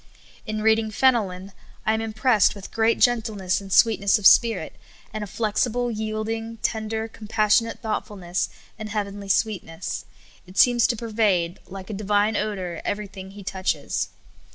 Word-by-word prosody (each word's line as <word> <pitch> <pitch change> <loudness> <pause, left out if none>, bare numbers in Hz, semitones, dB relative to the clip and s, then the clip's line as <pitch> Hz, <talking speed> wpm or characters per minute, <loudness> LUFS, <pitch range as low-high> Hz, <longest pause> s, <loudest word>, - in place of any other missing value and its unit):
In 215 0 -3
reading 220 0 +3
Fenelon, 205 -6 +1 0.3
I 220 - +3
am 220 - 0
impressed 220 -1 +2
with 200 -1 -10
great 225 0 +2
gen 240 -2 +4
tleness 200 -4 -2
and 195 -1 -10
sweetness 200 +1 +4
of 210 - -7
spirit, 220 -6 +5 0.4
and 215 -1 -3
a - - -5
flexible, 235 +4 0
3'ield 215 -1 -3
ing, 225 0 -4
tender, 220 0 -1
compassionate 220 +1 +1
thoughtfulness, 195 -5 -2 0.3
and 215 0 -5
heav 210 -1 -1
enly 200 0 -9
sweetness. 185 -5 -1 0.4
It 185 +2 -13
seems 240 -1 +5
to 250 - 0
pervade, 210 -6 0
like 195 +2 -8
a - - -4
divine 205 +1 +1
odor, 185 -6 -3
everything 200 -2 -5
He 200 +1 -11
touches. 185 0 -2
215 Hz, 155 wpm, -24 LUFS, 195-225 Hz, 0.4 s, spirit